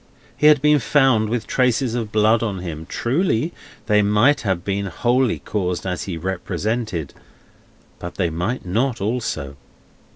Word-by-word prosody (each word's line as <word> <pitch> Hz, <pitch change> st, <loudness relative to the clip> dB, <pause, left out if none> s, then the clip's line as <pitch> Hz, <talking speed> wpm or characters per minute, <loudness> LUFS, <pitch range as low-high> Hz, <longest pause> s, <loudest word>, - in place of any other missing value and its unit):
He 150 Hz, -, +3 dB
had 150 Hz, -2 st, +5 dB
been 150 Hz, 0 st, +5 dB
found 125 Hz, -3 st, +3 dB
with 120 Hz, 0 st, -2 dB
traces 125 Hz, -1 st, +1 dB
of 115 Hz, -3 st, -3 dB
blood 110 Hz, +1 st, +3 dB
on 105 Hz, -4 st, -2 dB
him; 80 Hz, -3 st, -6 dB
truly, 150 Hz, +3 st, 0 dB, 0.3 s
they 105 Hz, -1 st, +3 dB
might 105 Hz, +8 st, +3 dB
have 95 Hz, -4 st, -2 dB
been 100 Hz, 0 st, -1 dB
wholly 120 Hz, +6 st, +1 dB
caused 90 Hz, -4 st, -3 dB
as 90 Hz, -1 st, -3 dB
he 90 Hz, -4 st, -4 dB
represented, 95 Hz, -, -3 dB, 0.9 s
but 85 Hz, 0 st, -7 dB
they 85 Hz, -4 st, 0 dB
might 90 Hz, +10 st, -3 dB
not, 115 Hz, +7 st, 0 dB
also. 100 Hz, -, -3 dB
110 Hz, 150 wpm, -21 LUFS, 95-125 Hz, 0.9 s, had